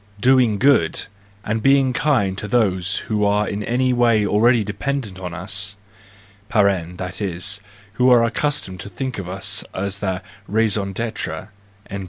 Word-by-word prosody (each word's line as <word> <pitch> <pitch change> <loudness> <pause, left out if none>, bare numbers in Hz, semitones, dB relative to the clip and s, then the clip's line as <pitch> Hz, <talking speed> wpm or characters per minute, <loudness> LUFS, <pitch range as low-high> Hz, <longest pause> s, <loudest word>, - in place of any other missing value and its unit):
Doing 125 -3 +4
good 130 - +3 0.4
and 110 +1 -1
being 135 -1 +4
kind 130 -12 +1
to 105 - -5
those 100 -4 +1
who 105 -1 0
are 105 0 +2
in 105 - -3
any 125 +3 +1
way 115 -3 +3
already 110 +3 +3
dependent 105 -1 -3
on 90 -2 -5
us 95 +2 -3 0.8
(that 90 -2 0
is, 95 +1 -2 0.3
who 125 +3 +3
are 120 -2 +6
accustomed 115 -5 -1
to 95 - -7
think 130 +4 -4
of 90 -2 -6
us 95 +1 -2
as 100 +1 -2
their 95 -2 -2 0.2
raison 105 -2 +1
d? 115 +3 -2
105 Hz, 145 wpm, -21 LUFS, 95-120 Hz, 0.8 s, are